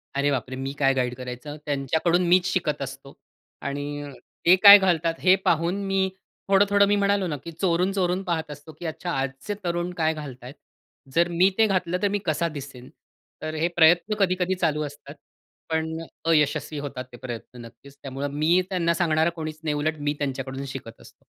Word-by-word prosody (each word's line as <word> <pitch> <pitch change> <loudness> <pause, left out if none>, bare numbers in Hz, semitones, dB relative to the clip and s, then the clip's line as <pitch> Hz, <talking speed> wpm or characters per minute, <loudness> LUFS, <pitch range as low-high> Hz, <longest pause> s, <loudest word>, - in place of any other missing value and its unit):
अरे, 140 +1 +2
बापरे! 130 -1 -3
मी 135 +1 -4
काय 135 -2 +3
गाईड 125 -2 -1
करायचं? 125 +3 -7
त्यांच्याकडून 160 +5 +1
मीच 180 +1 +4
शिकत 150 -6 -1
असतो. 135 +1 -7 0.5
आणि 145 +1 -5 0.3
ते 175 - +8
काय 200 0 +12
घालतात 170 -4 +1
हे 185 0 +5
पाहून, 170 +2 +2
मी 195 0 +1 0.4
थोडं-थोडं 200 +1 +4
मी 205 - +3
म्हणालो 200 -1 +1
ना, 150 -4 -3
की 170 - -7
चोरून, 175 +2 +1
चोरून 185 0 0
पाहत 160 -4 -2
असतो, 145 +2 -10
की 175 - -7
"अच्छा, 170 +2 -4
आजचे 135 +7 -3
तरुण 175 0 -2
काय 160 -1 +2
घालत 140 -5 -9
आहेत, 125 +2 -9 0.6
जर 170 +1 +4
मी 180 +3 +4
ते 225 - +5
घातलं, 180 -3 0
तर 205 - +3
मी 205 +1 -1
कसा 170 +1 0
दिसेन?" 130 -2 -10 0.5
तर 155 0 -4
हे 160 +2 +1
प्रयत्न 175 +5 +4
कधी-कधी 185 -1 +1
चालू 160 -4 0
असतात. 145 0 -10 0.5
पण 160 0 -1
अ, - - -7 0.2
अयशस्वी 150 -1 +1
होतात 140 -3 -5
ते 120 - -11
प्रयत्न 120 0 -8
नक्कीच. 125 +4 -15
त्यामुळे 135 +1 -4
मी 155 +6 +2
त्यांना 170 -3 +1
सांगणारा 160 -2 +2
कोणीच 155 -2 -6
नाही, 150 -2 0
उलट 155 +2 -1
मी 145 0 -1
त्यांच्याकडून 135 -1 -4
शिकत 130 -4 -9
असतो. - - -18
160 Hz, 180 wpm, -25 LUFS, 140-180 Hz, 0.6 s, काय